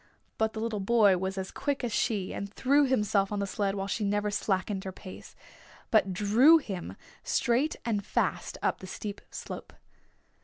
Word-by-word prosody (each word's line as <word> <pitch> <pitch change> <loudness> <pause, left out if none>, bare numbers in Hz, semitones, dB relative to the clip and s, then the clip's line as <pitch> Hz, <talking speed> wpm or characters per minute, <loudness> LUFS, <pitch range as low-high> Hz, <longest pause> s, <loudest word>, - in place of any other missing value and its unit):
But 220 0 +1
the 220 - -5
little 220 -2 -2
boy 200 -2 +4
was 190 +1 -3
as 190 0 -4
quick 285 -2 -2
as 235 -3 -2
she 205 -5 0
and 200 0 -5
threw 280 +6 +3
himself 210 -5 +1
on 205 - -1
the 200 - 0
sled 195 0 -1
while 195 -1 -2
she 205 +2 -2
never 205 +1 0
slackened 195 -1 -1
her 190 - -5
pace, 185 0 -11 0.6
but 215 -4 +4
drew 220 - +6
him 195 - -6 0.2
straight 260 +5 +1
and 210 -4 0
fast - - -1
up - - +1
the 190 - -9
steep 205 +2 -6
slope. - - -8
205 Hz, 180 wpm, -29 LUFS, 195-230 Hz, 0.6 s, drew